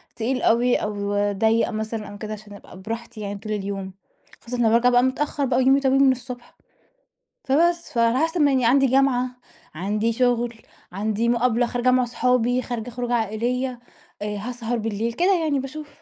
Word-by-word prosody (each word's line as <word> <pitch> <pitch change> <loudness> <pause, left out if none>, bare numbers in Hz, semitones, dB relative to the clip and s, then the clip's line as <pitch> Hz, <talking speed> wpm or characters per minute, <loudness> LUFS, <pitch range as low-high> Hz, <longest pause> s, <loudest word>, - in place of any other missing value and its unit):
تقيل 250 +3 -1
أوي، 245 +2 +3
أو 205 -1 -3 0.2
ضيَّق 220 +3 +2
مثلًا 220 -1 -4
أو 205 - -9
كده 215 0 -6
عشان 210 -1 -10
أبقى 190 -2 -13
براحتي 225 +1 -6
يعني 200 0 -5
طول 215 0 -7
اليوم. 195 -2 -4 0.5
خاصةً 245 +1 -5
لمّا 230 -2 +3
بارجع 235 +2 +4
بقى 245 0 +4
متأخر 280 +2 0
بقى 250 -1 +1
ويومي 265 +2 +4
طويل 270 0 +3
من 265 - +6
الصبح. 250 -1 -7 0.9
فبس 335 +3 +1
فعلي 230 +1 +2
حسب 330 0 -2
ما 285 -1 +4
يعني 255 -3 +2
عندي 270 +3 +4
جامعة، 255 -1 +2 0.5
عندي 210 +6 -1
شغل، 240 -1 +1 0.4
عندي 215 +4 -1
مقابلة 240 0 +2
خارجة 245 +1 +1
مع 255 0 +3
اصحابي، 250 0 +1
خارجة 240 -2 -5
خروجة 245 0 -3
عائليّة، 240 +3 -1 0.4
آآ 210 0 -3
هاسهر 240 +2 -3
بالليل 225 +1 -2
كده 360 +10 +3
يعني 290 -3 +1
باشوف. 295 +3 -7
240 Hz, 170 wpm, -23 LUFS, 220-255 Hz, 0.9 s, من